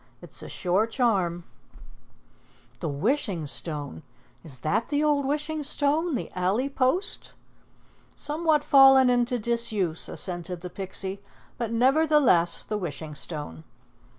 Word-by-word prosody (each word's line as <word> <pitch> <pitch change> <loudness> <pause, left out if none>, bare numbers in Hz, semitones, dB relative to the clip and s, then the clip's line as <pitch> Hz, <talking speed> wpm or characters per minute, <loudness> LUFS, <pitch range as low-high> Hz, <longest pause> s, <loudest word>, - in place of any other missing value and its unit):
It's - - -11
a - - -8
sure 190 +5 0
charm." 195 -8 0 1.4
"The 165 - -3
Wishing 190 - -1
Stone! 145 0 -3 0.4
Is 140 -5 -9
that 155 +9 0
the 290 0 +1
old 290 -2 +2
Wishing 300 +2 -2
Stone 295 +2 0
the - - -4
alley 195 +9 0
post?" 275 +9 -1 0.8
"Somewhat 305 0 0
fallen 270 -2 +7
into 245 0 +1
disuse," 215 -7 -1
assented 175 -1 -5
the 180 0 -7
Pixie, 190 +1 -5 0.4
"but 230 -2 -2
never 265 +7 +3
the 300 0 +5
less 175 - +3
the 210 -1 -3
Wishing 155 -3 -6
Stone." 150 +1 -7
230 Hz, 125 wpm, -26 LUFS, 175-280 Hz, 1.4 s, fallen